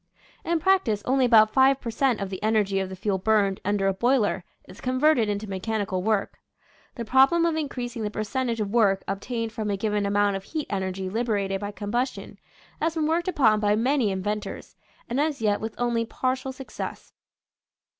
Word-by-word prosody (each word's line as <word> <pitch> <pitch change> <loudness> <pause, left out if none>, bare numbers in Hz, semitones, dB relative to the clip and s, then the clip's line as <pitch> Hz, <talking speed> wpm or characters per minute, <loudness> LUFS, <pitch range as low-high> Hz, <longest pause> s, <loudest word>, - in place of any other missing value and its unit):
In 335 0 0
prac 385 +3 +3
tice 210 -2 -1
only 260 0 +3
about 220 -3 +5
5 270 0 +5
per 235 - -5
cent, 250 -1 +1
of 195 -1 -4
the 190 - -5
energy 210 -2 +1
of 190 -1 -3
the 190 - -7
fuel 190 +1 -1
burned 200 -1 +2
under 200 0 0
a 195 - +2
boiler 220 -3 +1 0.2
is 185 - -13
converted 255 -3 +2
into 205 +1 -3
mechanical 195 -1 -2
work. 210 0 -1 0.6
The 235 - -5
problem 270 +8 +4
of 335 -1 +1
in 305 -3 -2
creasing 245 -3 -5
the 210 - -1
percentage 230 +3 -2
of 205 -2 -2
work 205 -4 +3
obtained 225 +3 -3
from 215 -1 -4
a 200 - -1
given 210 0 0
amount 205 0 +2
of 195 - -9
heat 310 +4 -4
energy 190 -1 -2
liberated 200 -2 -1
by 205 - -3
combustion 225 +5 -3 0.4
has 325 +1 0
been 315 -2 0
worked 330 +3 0
upon 225 -12 +3
by 210 0 +2
many 250 0 +2
in 190 -1 -3
ventors, 210 +1 -4 0.3
and 250 +4 0
as 300 -1 -1
yet 210 -2 +1
with 220 0 -5
only 240 -1 0
partial 260 +3 -2
success. 265 0 -8
220 Hz, 195 wpm, -25 LUFS, 200-260 Hz, 0.6 s, about